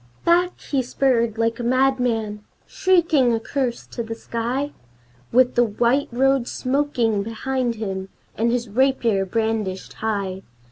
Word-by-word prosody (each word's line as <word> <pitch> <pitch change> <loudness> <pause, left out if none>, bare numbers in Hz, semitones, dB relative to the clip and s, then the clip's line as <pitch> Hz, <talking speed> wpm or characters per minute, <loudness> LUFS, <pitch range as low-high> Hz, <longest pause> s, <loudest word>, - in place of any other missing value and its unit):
Back, 355 +1 +3
he 275 -2 -1
spurred 235 -3 +1
like 230 +1 0
a - - -3
madman, 245 -4 +1 0.2
shrieking 335 -9 +3
a 225 - +1
curse 250 0 -2
to 235 - -6
the 225 0 -5
sky, 240 +5 -3 0.6
With 255 +1 +4
the 240 - +4
white 240 +5 +1
road 265 0 +2
smoking 255 -6 0
behind 240 +3 -2
him 195 -3 -4 0.3
and 230 +2 +1
his 240 -1 -1
rapier 230 -4 +1
brandished 220 -3 -2
high! 200 -4 -3
235 Hz, 135 wpm, -22 LUFS, 220-265 Hz, 0.6 s, With